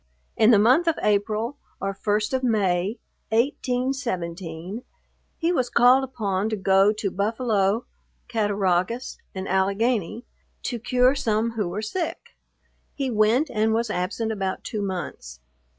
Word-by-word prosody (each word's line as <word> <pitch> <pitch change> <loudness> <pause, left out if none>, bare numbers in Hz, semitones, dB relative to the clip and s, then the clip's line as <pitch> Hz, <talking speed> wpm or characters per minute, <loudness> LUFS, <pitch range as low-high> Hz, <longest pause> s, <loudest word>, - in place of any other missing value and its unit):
In 220 - +5
the 230 - +7
month 255 +11 +4
of 330 - +2
April, 215 +5 0 0.2
or 195 0 -2
first 210 +3 -1
of 260 - +1
May, 205 -3 +1 0.3
1817, 220 - -2 0.6
he 335 +1 +1
was 250 -7 0
called 250 +3 +5
upon 210 -6 -2
to 220 - -1
go 195 0 +4
to 210 -2 -3
Buffalo, 215 +1 0 0.4
Cattaraugus 205 0 0 0.2
and 190 0 -4
Allegany, 200 +3 0 0.4
to 240 - -3
cure 250 +3 +3
some 225 -4 0
who 215 -5 -2
were 205 +5 -4
sick. 335 +11 -4 0.6
He 270 -3 -2
went, 225 +7 +2
and 220 0 +1
was 230 -1 0
absent 205 +5 -2
about 195 -3 -3
two 215 - -4
months. 175 - -5
215 Hz, 135 wpm, -24 LUFS, 195-245 Hz, 0.6 s, the